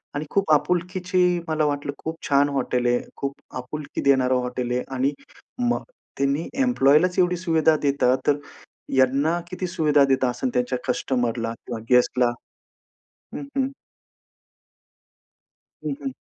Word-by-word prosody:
आणि 145 +2 -2
खूप 195 -5 +1
आपुलकीची 180 +3 +1 0.2
मला 155 -1 +1
वाटलं, 145 -1 -1
खूप 160 +1 -4
छान 140 +1 +4
हॉटेल 125 -3 0
आहे. 120 0 +3 0.2
खूप 140 0 -3 0.2
आपुलकी 140 +4 -5
देणारं 130 -1 +4
हॉटेल 125 0 -3
आहे 125 0 0
आणि 135 +3 +1 0.6
मग - - 0 0.3
त्यांनी 140 +4 0 0.2
एम्प्लॉयीलाच 180 - +3
एवढी 180 0 +3
सुविधा 160 -3 +3
देतात 135 -3 +2
तर 145 - +4 0.6
यांना 140 +6 +3
किती 185 0 -3
सुविधा 150 -4 +3
देत 135 -1 +2
असेल 125 +1 -1
त्यांच्या 125 +1 0
कस्टमरला 120 -3 -1
किंवा 115 -2 -5
गेस्टला. 125 0 +4 1.0
हं, - - -5
हं. 265 -1 +2 2.2
हं, - - -2
हं. 270 -2 -3
140 Hz, 130 wpm, -24 LUFS, 125-165 Hz, 2.2 s, छान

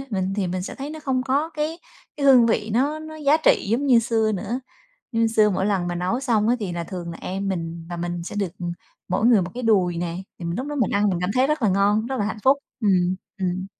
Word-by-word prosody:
mình 190 -1 -1
thì 195 - 0
mình 180 +1 -3
sẽ - - -6
thấy 280 +2 -6
nó 315 0 -7
không 265 -3 0
có 275 +5 0
cái 310 +1 -3 0.4
cái 285 -1 0
hương 255 -4 +7
vị 220 -1 0
nó 280 +7 +1
nó 315 0 -9
giá 300 0 +3
trị 315 - +3
giống 255 +6 +1
như 245 -3 +6
xưa 225 -1 +1
nữa. 235 +6 -3 0.5
Như 230 0 +2
xưa 215 -1 +4
mỗi 190 0 0
lần 195 -4 0
mà 175 - -2
nấu 180 +8 -1
xong 230 -6 +1
á 245 - +4
thì 200 -5 -3
là 170 -1 -3
thường 170 -1 -6
là - - -8
em 195 +2 -3
mình 165 -3 -4
và 175 - -5
mình 175 0 -3
sẽ 195 - -7
được, 195 -4 -3
ừm, 175 -1 -3 0.4
mỗi 190 +4 0
người 235 -4 +6
1 175 0 -4
cái 250 - -5
đùi 185 -6 +2
nè. 170 0 -3 0.2
Thì 170 - -6
mình 170 +3 -2
lúc 260 +4 -3
đó 295 - -4
mình 245 -8 +1
ăn 205 0 +2
mình 180 -3 -1
cảm 180 - 0
thấy 255 +2 +3
rất 300 -2 0
là 215 - +3
ngon, 205 +3 +2
rất 265 - -3
là 205 - +1
hạnh 215 - -3
phúc. 270 +2 +5 0.2
Ừm, 185 -3 +2 0.2
ừm. 185 0 -2
210 Hz, 275 wpm, -23 LUFS, 180-255 Hz, 0.5 s, hương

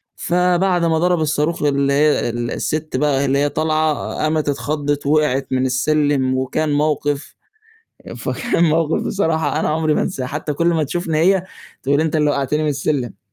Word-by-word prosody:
فبعد 180 0 +1
ما 160 -1 +2
ضَرَب 175 0 +2
الصاروخ 155 +1 0
واللي 140 -1 +1
هي 150 -3 +2
السِت 125 +6 -3
بقى 140 -1 +1
اللي 135 0 +1
هي 145 +1 +2
طالعة 155 0 +1 0.2
قامت 155 -1 0
اتخضِّت 145 0 -2
ووقعت 140 -2 +1
من 130 0 +1
السلّم 135 0 +1
وكان 140 +4 -1
موقِف 145 -1 -1 0.8
فكان 170 - 0
موقِف 160 0 +1
بصراحة 165 -5 0
أنا - - 0
عُمري 155 0 +1
ما - - +1
انساه، 130 - -3
حتى 150 +3 -4
كُلّ 170 +4 -1
ما 165 -3 +1
تشوفني 160 +1 -2
هي 185 +3 +3 0.4
تقول 140 +2 +2
لي: - - +3
"أنت 160 0 0
اللي 150 -1 +2
وقّعتني 145 +2 -1
من 155 - 0
السلّم." 140 -5 -2
150 Hz, 165 wpm, -19 LUFS, 140-160 Hz, 0.8 s, هي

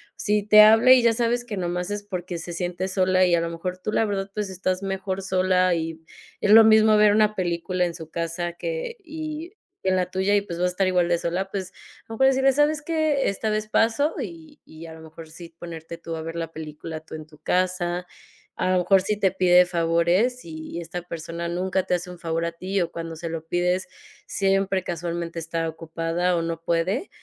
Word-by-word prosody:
si 210 -1 0
te 215 +1 +8
habla 225 +4 +7
y 255 - +5
ya 235 -1 +4
sabes 240 +1 0
que 215 -4 -5
nomás 180 0 -2
es 205 0 -4
porque 180 -3 -5
se 175 +1 -7
siente 180 +2 -3
sola 185 -1 +2
y 180 - +2
a 170 - +3
lo 165 - -2
mejor 180 +2 -5
tú, 200 - -3
la 225 - +2
verdad, 200 -2 -3
pues, 210 -2 -3
estás 185 +1 -2
mejor 195 0 -3
sola 185 -1 +2
y 165 -1 -3 0.4
es 205 - +2
lo 225 +1 +10
mismo 220 0 +6
ver 210 -1 +6
una 215 0 +3
película 180 0 -1
en 170 - -4
su 160 -2 -9
casa 170 +1 -3
que 485 - -5
y 315 +1 -6 0.3
en 190 - +2
la 180 -1 -1
tuya 190 +2 +1
y, 205 - +3
pues, 175 -4 -7
vas 180 - +2
a - - -2
estar 185 +1 0
igual 180 -2 +2
de 170 - +3
sola. 180 +3 -2
Pues, 190 -2 -5
a - - -20
lo 225 - -5
mejor 265 +4 +4
decirle: 265 0 +4
"¿Sabes 295 +2 +1
que? 310 -3 +1
esta 205 +2 -2
vez 215 0 -1
paso" 230 +8 +2
y 170 -8 -9
y 160 +1 -12
a 160 - -9
lo 160 - -12
mejor 160 +1 -12
sí 165 0 -12
ponerte 165 -1 -8
tú 165 -1 -6
a 160 - -5
ver 165 +1 -6
la 165 -1 -4
película 155 0 -7
tú 160 0 -11
en 155 -1 -8
tu 155 -1 -20
casa. 180 -1 -1 0.5
A 185 - +1
lo - - +3
mejor 190 +2 +4
sí 210 +3 -1
te 190 -2 +3
pide 180 -1 +5
favores 175 +8 +1
y 160 +1 -7
esta 175 +1 -6
persona 170 0 -6
nunca 185 +2 -1
te 180 - 0
hace 180 +1 -5
un 180 - -11
favor 165 0 -2
a 170 - -2
ti 185 +4 -3
o 170 -1 -2
cuando 165 -1 -6
se 165 +1 -6
lo 160 0 -6
pides, 180 +2 0 0.4
siempre 195 -1 +1
casualmente 170 -1 -4
está 165 0 -3
ocupada 165 +2 -2
o 170 - 0
no 165 0 -4
puede. 170 - -1
180 Hz, 225 wpm, -24 LUFS, 170-205 Hz, 0.5 s, lo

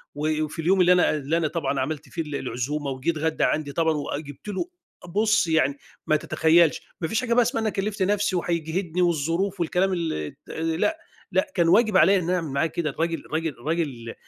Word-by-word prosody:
و 155 +1 0
وفي 155 +1 -6
اليوم 185 +4 +3
اللي 180 0 +5
أنا 180 - +4
اللي 150 +2 -1
أنا 165 -2 +1
طبعًا 150 -3 -2
عملت 145 +2 -3
فيه 165 - -3
ال 150 -2 -5
العزومة 140 +3 -3
وجه 130 +5 -3
اتغدا 160 0 0
عندي 145 -2 -1
طبعًا، 160 0 +2
وجبت 145 +1 -5
له 205 - -2 0.4
بُص، 215 +1 +2
يعني 150 -4 +2 0.3
ما 155 - +4
تتخيلش، 160 +1 +3 0.2
ما 165 - 0
فيش 220 +8 0
حاجة 235 -2 0
بقى 245 - +5
اسمها 230 -1 0
أنا 220 - +1
كلِّفت 205 0 -3
نفسي 205 -1 +1
وهيجهدني 170 +1 -1
والظروف 175 +3 0
والكلام 180 +3 +1
الت 120 - -4
لأ، 165 - 0 0.3
لأ، 295 - +1
كان 170 -3 +3
واجب 215 +1 +4
عليّا 190 +5 +6
إن 175 -1 -3
أعمل 180 -3 0
معاه 140 +3 +2
كده، 160 0 -2
الراجل 165 +3 -2
الراجل 160 +1 -2
الراجل 135 -4 -3
165 Hz, 195 wpm, -25 LUFS, 150-185 Hz, 0.4 s, عليّا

